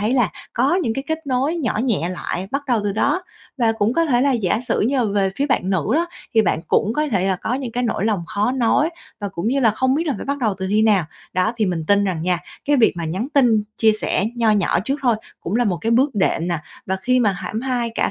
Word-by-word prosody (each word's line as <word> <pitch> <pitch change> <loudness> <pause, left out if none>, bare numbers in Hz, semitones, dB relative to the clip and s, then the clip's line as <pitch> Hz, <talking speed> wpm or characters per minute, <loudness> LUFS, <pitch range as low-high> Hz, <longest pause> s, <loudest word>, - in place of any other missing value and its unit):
thấy 215 +4 +1
là 245 -7 +3 0.2
có 265 +8 +2
những 225 -7 -1
cái 270 - -4
kết 320 0 -3
nối 270 +5 0
nhỏ 245 -10 -1
nhẹ 200 -9 0
lại 180 +1 -4
bắt 275 +1 -1
đầu 240 -5 +2
từ 200 - 0
đó. 285 - +1 0.4
Và 230 -2 +3
cũng 225 0 0
có 335 - +3
thể 250 -6 +2
là 275 +1 +3
giả 220 -2 0
sử - - +1
như 255 +6 +1
là 245 - +2
về 200 -2 +1
phía 285 - 0
bạn 225 -9 0
nữ 185 -5 +1
đó, 335 +3 +2 0.3
thì 220 - +5
bạn 170 -5 0
cũng 210 - +2
có 300 +4 0
thể 195 -9 0
là 190 -1 +1
có 225 - -2
những 255 -3 -4
cái 245 - -1
nỗi 220 -4 -1
lòng 210 -5 0
khó 210 +6 0
nói 265 +5 +2 0.3
và 205 - -2
cũng 195 +2 -3
như 275 +2 +1
là 230 - +5
không 260 +5 +1
biết 325 +4 -1
là 290 - 0
phải - - -6
bắt 280 +1 -1
đầu 220 -6 0
từ 190 - -3
khi 210 +2 +3
nào. 205 -5 +3 0.3
Đó, 185 +5 +1
thì 220 -2 +1
mình 170 -4 -2
tin 200 0 +3
rằng 180 -5 -2
nha, 180 0 +1 0.3
cái 290 0 +3
việc 235 -4 +4
mà 170 - -3
nhắn 185 +10 -3
tin 235 -6 +4 0.2
chia 220 -1 +5
sẻ 215 -2 -1
nho 230 -2 +3
nhỏ 205 -5 +2
trước 275 +3 -1
thôi 240 -4 +3 0.2
cũng 190 +6 -2
là 245 - +2
một 190 -5 0
cái 225 - -1
bước 260 +3 +3
đệm 180 -3 +1
nè. 170 - 0 0.3
Và 190 - 0
khi 255 +4 +3
mà 210 -4 +3
hãm 210 +4 -4
hai 245 -3 -1
cả - - +1
225 Hz, 280 wpm, -21 LUFS, 195-260 Hz, 0.4 s, thì